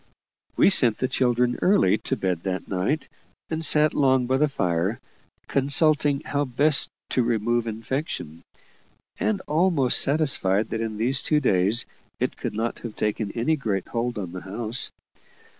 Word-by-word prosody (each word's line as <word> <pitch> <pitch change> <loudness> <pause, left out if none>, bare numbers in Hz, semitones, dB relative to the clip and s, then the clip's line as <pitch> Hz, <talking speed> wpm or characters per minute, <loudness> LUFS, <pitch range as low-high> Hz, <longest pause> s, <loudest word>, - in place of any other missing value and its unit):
We - - +5
sent 120 - +5
the 130 - -1
children 125 -1 +1
early 110 - +3
to 135 - -2
bed 95 -7 -2
that 95 0 -4
night, 100 +12 -1 0.4
and 160 0 -2
sat 155 -1 +4
long 130 -3 +2
by 130 +2 +1
the 150 +2 +3
fire, 90 - -1 0.5
consulting 145 +1 +2
how 145 -1 -2
best 140 +3 +3 0.2
to 130 - +2
remove 120 0 0
infection, 110 - -5 0.8
and 210 -3 0
almost 155 -5 +2
satisfied 125 -9 +1
that 115 - -3
in 110 -2 -4
these 125 +5 +1
two 150 - +1
days 100 -3 +2 0.3
it - - -1
could - - -5
not 115 +2 -3
have 115 -3 -8
taken 105 -1 -2
any 120 +7 +1
great 105 -10 -3
hold 120 0 -2
on 95 -5 -5
the 90 0 -7
house. 110 +6 -3
120 Hz, 155 wpm, -24 LUFS, 105-145 Hz, 0.8 s, We